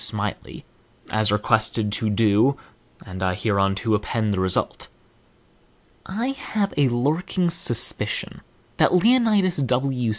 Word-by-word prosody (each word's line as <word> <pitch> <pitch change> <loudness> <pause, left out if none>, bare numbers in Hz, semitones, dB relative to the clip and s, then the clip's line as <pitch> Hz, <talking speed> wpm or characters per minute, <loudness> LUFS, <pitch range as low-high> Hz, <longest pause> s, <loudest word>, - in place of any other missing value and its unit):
Smiley, - - -5 0.5
as 110 -1 +2
requested 110 0 +1
to 110 +1 -1
do, 110 +5 +2 0.5
and 95 0 -8
I 90 -1 0
hereunto 100 +1 0
append 105 0 -1
the 95 - -2
result. 95 -1 -1 1.2
I 225 +7 -3
have 215 -7 -3
a 140 -3 +2
lurking 160 +8 -1
suspicion 145 -8 0 0.4
that - - +3
Leonidas 210 -3 +3
W. 130 -2 -1
120 Hz, 110 wpm, -22 LUFS, 105-175 Hz, 1.2 s, that